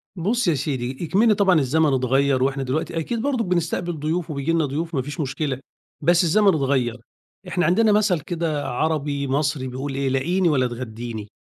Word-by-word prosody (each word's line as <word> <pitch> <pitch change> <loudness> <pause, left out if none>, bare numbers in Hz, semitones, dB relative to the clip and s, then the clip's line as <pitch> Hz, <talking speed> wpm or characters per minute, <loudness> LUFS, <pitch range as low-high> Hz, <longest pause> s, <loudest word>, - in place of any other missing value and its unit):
بُصّ 205 +6 0
يا 170 - +4
سيدي، 130 -3 -3
إكمن 210 +7 +3
طبعًا 195 -5 +3
الزمن 150 +1 +2
اتغيَّر 130 +1 +2
وإحنا 135 0 0
دلوقتي 155 +5 -2
أكيد 225 +8 -3
برضك 255 -3 0
بنستقبل 175 -2 -1
ضُيوف 160 +3 -2
وبييجي 140 +3 -1
لِنا 165 -2 +2
ضُيوف 160 +4 -3
ما 135 - +1
فيش 145 +6 -7
مشكلة، 140 -2 -2 0.4
بس 175 +3 +4
الزمن 205 +5 +3
اتغيّر، 135 -8 +2 0.5
إحنا 180 -1 0
عندنا 210 +6 +4
مَثَل 205 -4 +3
كده 160 -2 -3
عربي 145 0 -1
مصري 135 -1 0
بيقول 135 +2 -5
إيه، 135 -1 0
"لاقيني 170 +7 +1
ولا 130 -4 +2
تغدّيني"، 115 -2 -6
150 Hz, 175 wpm, -22 LUFS, 135-175 Hz, 0.5 s, يا